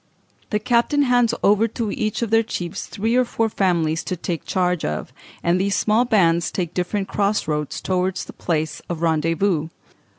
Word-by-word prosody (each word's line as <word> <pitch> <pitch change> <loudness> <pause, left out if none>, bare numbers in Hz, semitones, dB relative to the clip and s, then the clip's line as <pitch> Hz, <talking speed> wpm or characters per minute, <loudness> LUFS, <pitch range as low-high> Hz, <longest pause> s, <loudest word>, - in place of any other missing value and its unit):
The 210 - +1
captain 240 +6 +2
hands 245 -3 +3
over 210 +3 +4
to 230 -1 -3
each 215 +2 -2
of 225 - -3
the 225 0 +5
chiefs 175 -6 -5
three 225 +3 -1
or 255 - +5
four 225 -2 -1
families 170 -6 +1
to 185 - -2
take 170 -1 -4
charge 180 -2 0
of, 75 0 -3 0.3
and 175 +2 +2
these 200 +1 +1
small 220 +3 +2
bands 170 -8 +3
take 175 -3 -3
different 195 +2 -1
cross 205 -2 0
roads 150 -2 -2
towards 185 0 -1
the - - -10
place 160 -2 -2
of 170 -1 -3
rendezvous. 165 +1 +1
190 Hz, 175 wpm, -22 LUFS, 170-220 Hz, 0.3 s, the